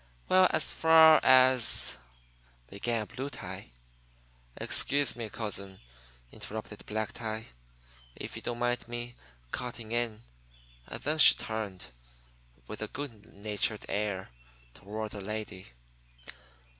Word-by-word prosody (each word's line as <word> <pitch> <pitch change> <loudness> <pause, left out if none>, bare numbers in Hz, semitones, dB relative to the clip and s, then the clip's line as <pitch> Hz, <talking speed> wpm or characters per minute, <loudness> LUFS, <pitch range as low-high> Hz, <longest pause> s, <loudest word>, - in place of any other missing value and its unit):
"Well, 185 0 +6
as 160 - +2
far 160 -1 +7
as 130 -1 +5 0.4
" - - -33
began 110 +2 -2
Blue 130 +4 -6
Tie. 95 - -8 0.9
"Excuse 140 0 +2
me, 115 -3 -5
cousin," 100 -3 -5 0.5
interrupted 105 -1 -8
Black 110 0 -2
Tie, 110 -1 -5 0.7
"if - - -7
you - - -7
don't 120 - -4
mind 120 0 -1
my 120 0 -6 0.4
cutting 120 -3 -5
in." 115 -2 -1 0.6
And - - -7
then 155 +2 0
he - - +9
turned, 105 - -5 0.7
with - - -8
a - - -2
good 115 -7 -8
natured 105 +1 -2
air, 100 -2 -2 0.4
toward 105 +2 -6
the 105 - -6
lady. 105 -2 -6
110 Hz, 120 wpm, -30 LUFS, 105-125 Hz, 0.9 s, he